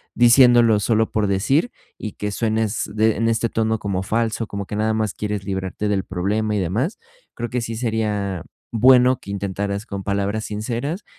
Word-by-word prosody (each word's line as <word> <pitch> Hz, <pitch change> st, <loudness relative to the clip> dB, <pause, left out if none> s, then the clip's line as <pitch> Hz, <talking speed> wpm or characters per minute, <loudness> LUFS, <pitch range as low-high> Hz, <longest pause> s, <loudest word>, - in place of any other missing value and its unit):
diciéndolo 120 Hz, -2 st, +6 dB
solo 110 Hz, +1 st, +1 dB
por 105 Hz, -1 st, +1 dB
decir 130 Hz, -, +1 dB, 0.3 s
y 110 Hz, -, -6 dB
que 105 Hz, 0 st, -3 dB
suenes 110 Hz, 0 st, -1 dB
de 110 Hz, 0 st, +2 dB
en 115 Hz, +1 st, +1 dB
este 115 Hz, +1 st, +1 dB
tono 110 Hz, -1 st, 0 dB
como 95 Hz, -2 st, -2 dB
falso, 115 Hz, +1 st, -1 dB
como 100 Hz, 0 st, -5 dB
que 105 Hz, -, -6 dB
nada 110 Hz, +1 st, +1 dB
más 110 Hz, -3 st, -1 dB
quieres 105 Hz, -2 st, -4 dB
librarte 95 Hz, +1 st, -3 dB
del 100 Hz, -2 st, 0 dB
problema 105 Hz, +4 st, -1 dB
y -, -, +1 dB
demás. 110 Hz, -, -1 dB, 0.4 s
Creo 120 Hz, 0 st, -4 dB
que 125 Hz, -1 st, -2 dB
sí 115 Hz, 0 st, -4 dB
sería 105 Hz, -6 st, -2 dB, 0.3 s
bueno 125 Hz, +2 st, +5 dB
que 100 Hz, -, -8 dB
intentaras 100 Hz, +1 st, -3 dB
con 100 Hz, -3 st, -6 dB
palabras 100 Hz, +2 st, -1 dB
sinceras 120 Hz, -, -3 dB
110 Hz, 175 wpm, -21 LUFS, 100-115 Hz, 0.4 s, diciéndolo